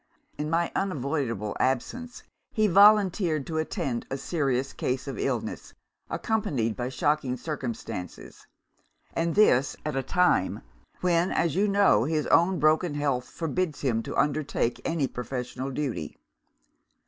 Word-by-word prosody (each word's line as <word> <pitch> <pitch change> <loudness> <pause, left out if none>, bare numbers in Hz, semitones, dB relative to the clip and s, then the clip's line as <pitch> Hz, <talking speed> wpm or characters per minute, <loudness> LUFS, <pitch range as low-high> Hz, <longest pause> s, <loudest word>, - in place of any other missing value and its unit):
In 150 +1 -3
my 170 +1 +1
unavoidable 135 - -2
absence, 240 - -2 0.3
he 215 - +2
volunteered 195 -6 +5
to 160 -1 -2
attend 135 -6 -2
a 135 - -2
serious 135 -4 -1
case 130 +2 -2
of 135 -5 -5
illness, - - -3 0.3
accompanied 135 - -1
by 125 0 -3
shocking 130 -1 0
circumstances 115 - -6 0.7
and 165 0 -1
this 145 -11 +4
at 150 - -2
a 135 - +1
time 175 - +1 0.4
when, 175 0 +2
as 170 -4 +1
you 200 +3 +3
know, 200 - +4
his 155 0 0
own 175 +2 +4
broken 155 +1 +2
health 140 -4 -1
forbids 165 -1 -2
him 120 -5 +1
to - - -6
undertake 145 -4 0
any 165 -4 0
professional 125 +1 -5
duty. 130 - -4
145 Hz, 130 wpm, -27 LUFS, 125-170 Hz, 0.7 s, volunteered